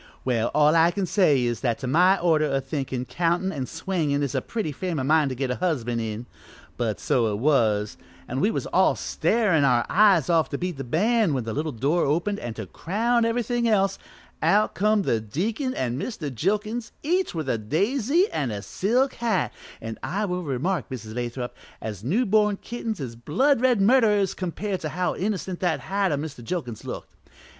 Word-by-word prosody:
Well, 120 -2 +1
all 150 +1 +5
I 165 +1 +5
can 190 +2 -2
say 160 -9 +3
is, 120 -2 -1
that 120 -4 0
to 135 - -6
my 180 +9 +4
order 160 -3 +3
o' 135 -1 0
thinkin' 135 -2 -3
countin' 170 +8 0
an' 130 -7 -4
swingin' 160 -4 -1
is 140 - -2
a - - 0
pretty 215 -10 -3
frame 175 +3 -3
o' - - -1
mind 150 +1 +3
to 130 - -4
get 130 0 -2
a 125 - -2
husband 120 -10 -1
in, 110 +1 -4 0.5
but 115 -4 -2
so 115 -4 +1
it - - -1
was, 110 -6 +2 0.3
an' 130 - -3
we 205 - +3
was - - -2
all - - +3
starin' 205 -10 +1
our 125 -3 +3
eyes 195 -6 +5
off 165 -5 +2
to 140 - -3
beat 180 -2 -3
the 135 - -4
band 200 - +2
when 130 - -1
the 110 0 -4
little 155 +4 -2
door 145 +9 +1
opened 175 +8 0
an', 120 -2 -6
to 110 - -5
crown 230 - 0
everythin' 235 +1 0
else, 195 -3 +2 0.4
out 200 +7 +3
come 210 +1 +2
the 115 - +1
deacon 215 - -2
an' 125 0 -2
Mr. 155 - -4
Jilkins, 215 - -1
each 360 - 0
with 155 -4 -3
a 115 -3 0
daisy 235 - +1
an' 135 -5 -1
a 100 -2 -5
silk 245 - +1
hat, 230 -6 -1 0.3
an' 115 0 -6
I 205 +3 -2
will 180 -2 -2
remark, 150 - -2
Mrs. 110 -4 -7
Lathrop, 120 +1 -4 0.2
as 105 -3 -6
new 200 - +1
born 210 -1 +3
kittens 225 -3 -5
is 125 -5 -5
blood 230 - +1
red 250 -4 +3
murderers 210 -3 +4
compared 190 +2 -3
to 155 - -4
how 180 +3 -1
innocent 190 -2 -3
that 175 -4 0
hat 195 -1 0
o' 145 - +1
Mr. 145 -4 -6
Jilkins' 120 -6 -4
looked. - - -7
165 Hz, 200 wpm, -25 LUFS, 130-205 Hz, 0.5 s, all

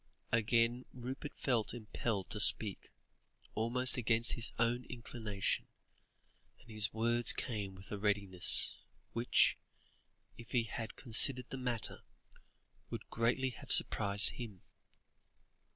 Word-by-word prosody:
Again 115 +2 0
Rupert 130 +3 -8
felt 120 -3 -2
impelled 110 -3 -5
to 105 - -2
speak, 105 -1 0 0.6
almost 120 +4 +5
against 115 -1 +1
his 120 - -2
own 115 +2 0
inclination, 110 -5 -3 0.9
and 115 - -17
his 110 0 -1
words 120 +1 +2
came 100 -5 -4
with 95 +2 -15
a 105 - -5
readiness, 100 -3 +1 0.4
which, 115 +1 +1 0.8
if 115 - -13
he 120 -2 +1
had 115 0 -7
considered 125 0 +4
the 135 - -5
matter, 125 -3 -2 0.9
would - - -9
greatly 120 +3 -1
have 120 - -10
surprised 100 0 +5
him. 110 -7 -10
115 Hz, 115 wpm, -33 LUFS, 105-120 Hz, 0.9 s, almost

